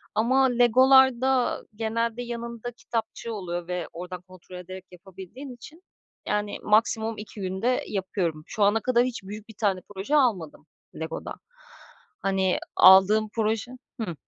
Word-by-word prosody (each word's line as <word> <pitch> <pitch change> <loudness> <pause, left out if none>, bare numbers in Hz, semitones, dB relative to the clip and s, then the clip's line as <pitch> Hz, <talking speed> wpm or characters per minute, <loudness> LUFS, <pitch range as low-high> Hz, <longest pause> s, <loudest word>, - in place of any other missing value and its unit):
ama 260 +5 +3
Lego'larda 260 +1 +4
genelde 230 +2 -2
yanında 235 0 -6
kitapçığı 230 -1 -5
oluyor 175 -4 -5
ve 180 -2 -3
oradan 180 +1 -7
kontrol 185 0 -15
ederek 185 +1 -9
yapabildiğin 190 +9 -11
için, 310 +9 -14 0.4
yani 210 0 -2
maksimum 220 +1 +2
2 210 -1 -9
günde 190 +7 -1
yapıyorum. 185 -5 -3
Şu 210 - -1
ana 205 +2 +4
kadar 245 0 +2
hiç 245 -5 -5
büyük 210 +3 -9
bir 220 - -12
tane 200 -4 +1 0.2
proje 200 +10 -1
almadım 200 - +1 0.3
Lego'dan. 160 0 -6 0.9
Hani, 190 -1 +1 0.2
aldığım 195 +4 +7
proje 225 +1 -1 0.3
Hı. 175 -7 -4
215 Hz, 130 wpm, -26 LUFS, 190-240 Hz, 0.9 s, aldığım